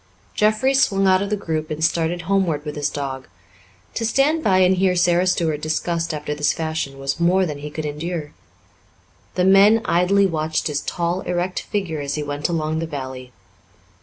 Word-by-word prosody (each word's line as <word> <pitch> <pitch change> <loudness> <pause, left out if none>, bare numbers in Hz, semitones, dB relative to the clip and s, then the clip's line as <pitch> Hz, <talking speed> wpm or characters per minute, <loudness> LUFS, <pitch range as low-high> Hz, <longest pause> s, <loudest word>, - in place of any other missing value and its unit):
Jeffrey 215 +5 +2
swung 200 -8 +3
out 185 0 +4
of 200 - -2
the 210 - +1
group 155 -5 -3
and 155 +1 0
started 165 +1 0
homeward 170 -5 0
with 150 - -5
his 145 -1 -1
dog. 135 -2 -5 0.7
To 230 - -3
stand 280 +8 +2
by 190 -2 +3
and 185 0 +4
hear 185 0 +2
Sara 175 +1 +3
Stuart 160 -5 0
discussed 165 +2 -1
after 150 -1 -4
this 150 0 +1
fashion 160 -4 -3
was 135 +3 -3
more 180 +2 +3
than 150 -4 -5
he 150 +1 -6
could 155 +1 -5
endure. 150 +1 -4 1.0
The 180 - +2
men 200 +3 +6
idly 195 +2 +3
watched 155 -3 -1
his 150 -1 -1
tall, 175 +1 -2
erect 180 0 -2
figure 185 -7 -3
as 140 0 -3
he 150 - -2
went 145 +2 -3
along 160 -2 -1
the 165 - -3
valley. 130 -4 -7
165 Hz, 185 wpm, -21 LUFS, 150-190 Hz, 1.0 s, men